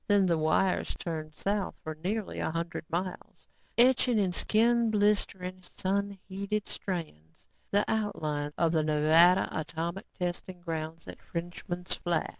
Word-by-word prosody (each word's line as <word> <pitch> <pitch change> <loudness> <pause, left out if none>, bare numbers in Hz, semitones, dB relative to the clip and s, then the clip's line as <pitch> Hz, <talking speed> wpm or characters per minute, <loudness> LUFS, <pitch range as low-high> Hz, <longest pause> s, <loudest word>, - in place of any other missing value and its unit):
Then 205 -2 +5
the 170 -3 +2
wires 160 +4 +2
turned 155 -2 -5
south 200 +1 -1
for 155 - -4
nearly 210 +2 -2
a - - 0
hundred 165 0 -3
miles, 180 +2 -4 0.3
etching 245 -1 +5
in 190 -4 +2
skin 230 +4 +3
blistering, 200 -3 +1
sun 200 +2 -2
heated 200 +2 -2
strands, 155 - -6 0.2
the 205 +1 +3
outlines 155 -9 -1
of 165 -1 +3
the 160 -2 +3
Nevada 155 +4 +5
atomic 165 +4 -3
testing 180 0 -4
grounds 165 -1 -5
at - - -9
Frenchman's 175 +1 -3
Flat. 170 -3 -1
180 Hz, 135 wpm, -30 LUFS, 165-200 Hz, 0.3 s, Then